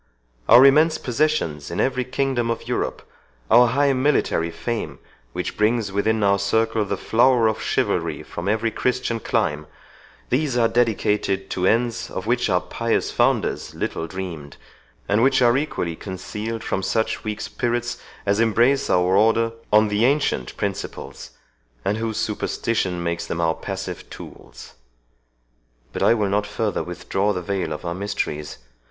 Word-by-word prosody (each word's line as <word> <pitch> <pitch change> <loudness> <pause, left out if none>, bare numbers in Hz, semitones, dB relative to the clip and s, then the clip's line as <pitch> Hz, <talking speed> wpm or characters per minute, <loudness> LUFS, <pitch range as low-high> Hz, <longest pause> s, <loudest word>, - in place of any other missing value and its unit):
Our 120 +4 +9
immense 155 +4 +5
possessions 125 - -1
in 85 - -4
every 130 -1 +1
kingdom 130 -2 -1
of 115 - -3
Europe, - - -3 0.4
our 125 0 +7
high 140 +3 +2
military 130 - +1
fame, 115 +7 -4 0.3
which - - -4
brings 105 -1 +1
within 105 +2 +1
our 100 0 +3
circle 110 +2 +1
the 100 0 -2
flower 120 +2 +3
of 110 0 -1
chivalry - - -1
from 85 +3 -5
every 110 +2 +1
Christian 125 0 -1
clime—these 115 - -3
are 115 -1 +4
dedicated 105 -4 0
to 90 0 0
ends 115 +1 +1
of 95 - -5
which 120 +2 +1
our 90 0 +2
pious 115 +6 -1
founders - - 0
little 80 - -3
dreamed, 85 -6 -7 0.5
and 105 +2 +2
which 135 +1 +4
are 120 -1 +4
equally 130 - -2
concealed 105 +5 -6
from 95 - -2
such 110 +3 -1
weak 105 -1 -4
spirits 120 0 -2 0.3
as 100 +1 +1
embrace 120 +5 +3
our 90 +1 +3
Order 115 +2 +3 0.2
on 105 0 +5
the 105 +2 +1
ancient 135 - 0
principles, - - -5 0.6
and 105 - +1
whose 110 -1 -3
superstition 100 -4 -1
makes 85 0 -2
them 85 - -3
our 80 -1 +2
passive - - -6
tools. - - -12 1.2
But - - -4
I 115 - +5
will 105 -3 0
not 105 +1 0
further 105 0 -2
withdraw 95 +3 -1
the 90 -2 -4
veil 95 -3 -2
of 75 +3 -5
our 85 - -2
mysteries. 85 -6 -4
110 Hz, 150 wpm, -22 LUFS, 95-120 Hz, 1.2 s, Our